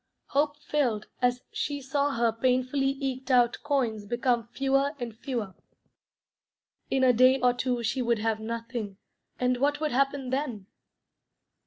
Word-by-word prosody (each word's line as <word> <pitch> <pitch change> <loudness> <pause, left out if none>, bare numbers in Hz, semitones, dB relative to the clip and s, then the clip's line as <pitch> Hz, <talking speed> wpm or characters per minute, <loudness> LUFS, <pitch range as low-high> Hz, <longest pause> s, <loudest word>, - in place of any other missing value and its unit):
Hope 290 +1 +1
failed 245 -9 0 0.2
as 245 0 +1
she 285 -1 -2
saw 280 +1 0
her 230 0 +2
painfully 255 +3 +1
eked 265 -1 -3
out 245 -2 +4
coins 255 -8 0
become 240 0 0
fewer 275 +3 +1
and 235 -3 -5
fewer. 225 -5 -4 1.4
In 265 -1 +1
a 255 -1 +6
day 255 +3 +5
or 250 -1 +4
two 245 -1 -1
she 255 +3 0
would 235 -1 +2
have 220 0 -1
nothing, 230 -2 -5 0.4
and 250 0 +2
what 290 +3 +1
would 305 -1 -1
happen 275 0 0
then? 260 -8 -2
255 Hz, 145 wpm, -28 LUFS, 235-275 Hz, 1.4 s, a